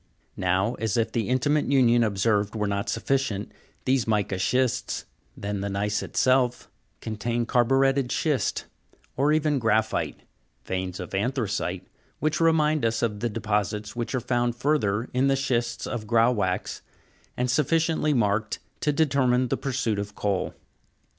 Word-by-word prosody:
Now, 95 +4 +1
as 110 -2 0
if 115 -1 +1
the 115 -2 -1
intimate 145 +4 +2
union 120 -3 +5
observed 105 0 +1
were 105 -1 0
not 100 0 -2
sufficient, 115 -3 -1 0.3
these 130 -3 +2
mica 105 -3 0
shists, 125 +4 0 0.3
then 100 -1 -3
the 100 - -2
gneiss 100 +2 -1
itself, 130 -1 +1 0.3
contain 115 +2 -2
carburetted 135 +2 +2
schist, 150 -5 0 0.5
or 140 +3 +2
even 150 -2 +2
graphite, 110 -1 0 0.5
veins 95 -1 -3
of - - -7
anthracite, 110 0 -1 0.3
which 155 +2 0
remind 155 -3 +3
us 115 +1 0
of 105 -3 -1
the 120 - -1
deposits 105 -1 -2
which 120 +2 -3
are - - +1
found 120 0 0
further 120 -5 0
in 130 +2 +2
the 135 - +3
schists 120 -3 -1
of 110 -3 -4
grauwackes, 115 -5 +1 0.6
and 125 0 0
suffi 150 +5 +2
ciently 160 -2 +1
marked 105 -2 +1 0.2
to 150 - +1
determine 130 -4 +2
the - - +1
pursuit 120 -6 -1
of 100 0 -5
coal. 100 -3 -1
120 Hz, 145 wpm, -26 LUFS, 105-135 Hz, 0.6 s, union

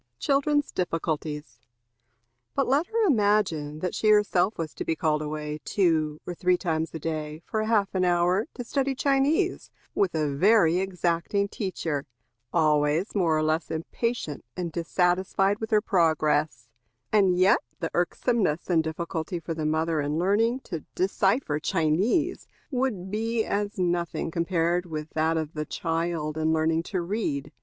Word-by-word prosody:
Children's 290 - +1
Difficulties. 155 -6 -3 1.0
But - - +1
let 285 +6 +2
her 455 -1 +1
imagine 200 - +1
that 180 - -2
she 215 - +1
herself 210 -2 +3
was 160 -2 -4
to - - -5
be 165 - -1
called 155 -1 0
away 150 0 -4
two 155 -6 +1
or 180 - -4
three 180 +1 +2
times 165 -3 -1
a - - -1
day, 155 0 -4
for 215 0 -1
half 210 -3 +1
an 185 -1 +1
hour, 180 +3 +2
to 245 - -5
study 270 +2 -1
Chinese, 285 +8 +1 0.2
with 190 -4 +1
a 150 -3 0
very 180 0 +4
exacting 185 +1 0
teacher, 165 -8 -3 0.4
always 155 +2 +2
more 170 -6 +2
or 155 - +1
less 155 +1 0
impatient 165 - -3
and 175 -2 -3
dissatisfied 180 +4 +1
with 220 - -4
her 215 -1 +4
progress; 155 - +1 0.5
and 190 -4 +4
yet 190 +5 +5 0.2
the 165 - -3
irksomeness 180 -1 0
and 165 -2 +3
difficulty 165 +2 -3
for 165 0 -4
the 155 -1 -2
mother, 160 0 +1
in 145 +2 -1
learning 220 +8 +2
to 170 -9 -5 0.2
decipher 190 - +1
Chinese, 195 - +1 0.2
would 240 -8 -1
be 225 +1 0
as 205 +1 -2
nothing 175 -2 -1
compared 170 +1 0
with 155 -1 -5
that 160 +1 +1
of 155 -1 -3
the 150 - -3
child 165 -1 -2
in 160 0 +2
learning 160 0 +2
to 180 +1 -3
read. 160 -7 -2
175 Hz, 150 wpm, -26 LUFS, 160-205 Hz, 1.0 s, yet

